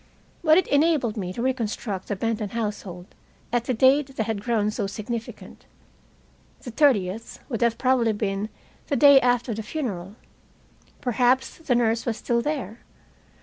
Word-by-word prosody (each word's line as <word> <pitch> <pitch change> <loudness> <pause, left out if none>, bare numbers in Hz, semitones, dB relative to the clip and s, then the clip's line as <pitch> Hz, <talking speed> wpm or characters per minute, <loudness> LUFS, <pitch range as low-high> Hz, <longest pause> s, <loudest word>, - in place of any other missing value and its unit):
But 315 0 +6
it 375 - +3
enabled 285 -6 +2
me 185 -4 -4
to 235 +6 -4
reconstruct 225 -6 -2
the 205 - -2
Benton 220 0 -2
household 205 -5 -5 0.4
at 240 -1 +1
the 255 - 0
date 270 +3 +3
that 220 - -1
had 220 -2 -3
grown 215 -2 0
so 210 -2 -2
significant. 225 +3 -7 1.0
The 245 - -7
30th 225 -6 +1
would 230 -4 -3
have 235 -1 +2
probably 255 -3 +2
been 205 0 -2 0.4
the 285 - 0
day 280 +1 +7
after 245 -1 +1
the 220 - -4
funeral. 210 - -5 0.9
Perhaps 250 +4 +1
the 275 -6 0
nurse 230 0 +1
was 230 -1 -1
still 235 -1 0
there. 265 -5 -4
235 Hz, 150 wpm, -24 LUFS, 210-260 Hz, 1.0 s, day